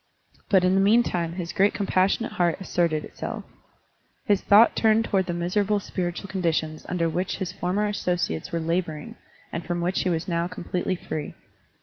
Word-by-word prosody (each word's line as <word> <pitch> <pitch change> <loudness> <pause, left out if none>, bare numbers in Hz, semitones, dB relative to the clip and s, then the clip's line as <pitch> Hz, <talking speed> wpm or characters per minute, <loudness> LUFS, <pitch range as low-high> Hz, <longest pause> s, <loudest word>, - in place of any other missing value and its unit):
But 190 -3 +5
in 185 0 +3
the 195 - +4
meantime 195 -6 +2
his 175 -1 -5
great 200 +2 +3
compassionate 195 +3 +1
heart 175 0 +1
asserted 170 -4 0
itself. - - -6 0.8
His 205 -2 +2
thought 210 +3 +6
turned 225 0 +3
toward 190 -4 +1
the 175 - -1
miserable 200 +4 +1
spir 180 -2 -3
itual 190 +3 -8
conditions 160 -4 -2
under 175 -2 0
which 180 +3 -2
his 190 -2 -3
former 185 +3 -1
asso 205 -3 0
ciates 175 0 -3
were 170 - -1
laboring 165 -2 -2 0.4
and 170 - -3
from 175 0 -2
which 180 +2 0
he 185 - 0
was 165 -2 -1
now 170 -1 0
completely 180 +1 -3
free. 155 -3 -5
180 Hz, 180 wpm, -25 LUFS, 170-195 Hz, 0.8 s, thought